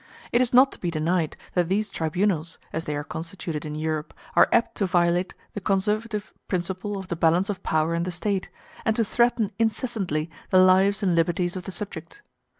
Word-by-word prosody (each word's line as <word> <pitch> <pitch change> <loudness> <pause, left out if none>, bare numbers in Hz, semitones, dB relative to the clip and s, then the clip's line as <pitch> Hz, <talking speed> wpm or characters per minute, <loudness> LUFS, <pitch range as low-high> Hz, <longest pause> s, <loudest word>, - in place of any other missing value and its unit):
It 240 - +4
is 250 - +1
not 260 +2 +6
to - - -12
be 175 - -2
denied 165 0 0 0.2
that 175 -2 +1
these 205 +1 0
tribunals, 170 0 0 0.2
as 160 +1 -3
they 150 - -2
are 145 - -3
constituted 160 -1 -5
in 150 0 -5
Europe, 155 0 -3 0.2
are - - +6
apt 235 - +3
to 200 - +1
violate 175 0 +1 0.2
the 205 - -5
conservative 210 +2 -1
principle 190 +3 -2
of 190 -1 -7
the 170 - -1
balance 170 +5 +3
of 190 -2 -7
power 160 -1 +1
in 170 - 0
the 175 - -2
State, 195 +2 -2 0.3
and 220 - +1
to 230 - +2
threaten 235 -1 +2
incessantly 210 - -1 0.2
the 185 - +4
lives 190 +2 +5
and 185 -3 +3
liberties 175 +2 +1
of 180 -2 -6
the - - -5
subject. 200 - -7
185 Hz, 195 wpm, -25 LUFS, 165-205 Hz, 0.3 s, not